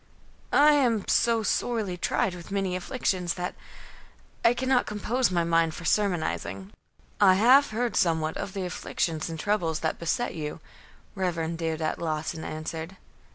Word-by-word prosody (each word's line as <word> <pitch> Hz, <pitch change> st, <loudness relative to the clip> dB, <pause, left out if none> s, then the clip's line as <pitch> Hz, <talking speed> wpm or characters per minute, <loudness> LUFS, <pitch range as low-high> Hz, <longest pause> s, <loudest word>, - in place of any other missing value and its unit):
"I 295 Hz, +1 st, +6 dB
am 245 Hz, -8 st, +2 dB
so 230 Hz, -1 st, +2 dB
sorely 215 Hz, -4 st, -1 dB
tried 180 Hz, +1 st, 0 dB
with 175 Hz, -2 st, -10 dB
my 200 Hz, -, -4 dB
many 195 Hz, -2 st, 0 dB
afflictions, 185 Hz, -3 st, -1 dB
that 180 Hz, 0 st, -3 dB, 0.9 s
I 235 Hz, -, +5 dB
cannot 260 Hz, 0 st, +1 dB
compose 235 Hz, +5 st, 0 dB
my 175 Hz, -2 st, +1 dB
mind 165 Hz, -1 st, +2 dB
for 165 Hz, -, -8 dB
sermonizing." 190 Hz, 0 st, -1 dB, 0.5 s
"I 190 Hz, -2 st, +6 dB
have 255 Hz, +8 st, +6 dB
heard 235 Hz, +2 st, -2 dB
somewhat 160 Hz, -2 st, +1 dB
of 195 Hz, -, -5 dB
the 195 Hz, -2 st, -3 dB
afflictions 165 Hz, -2 st, -2 dB
and 165 Hz, -1 st, -6 dB
troubles 170 Hz, -5 st, 0 dB
that 160 Hz, -, -1 dB
beset 205 Hz, +9 st, -1 dB
you," 150 Hz, -1 st, -5 dB, 0.5 s
Rev. 170 Hz, -4 st, -2 dB
Deodat 160 Hz, -1 st, -2 dB
Lawson 160 Hz, 0 st, -3 dB
answered. 160 Hz, +3 st, -6 dB
180 Hz, 150 wpm, -27 LUFS, 165-215 Hz, 0.9 s, I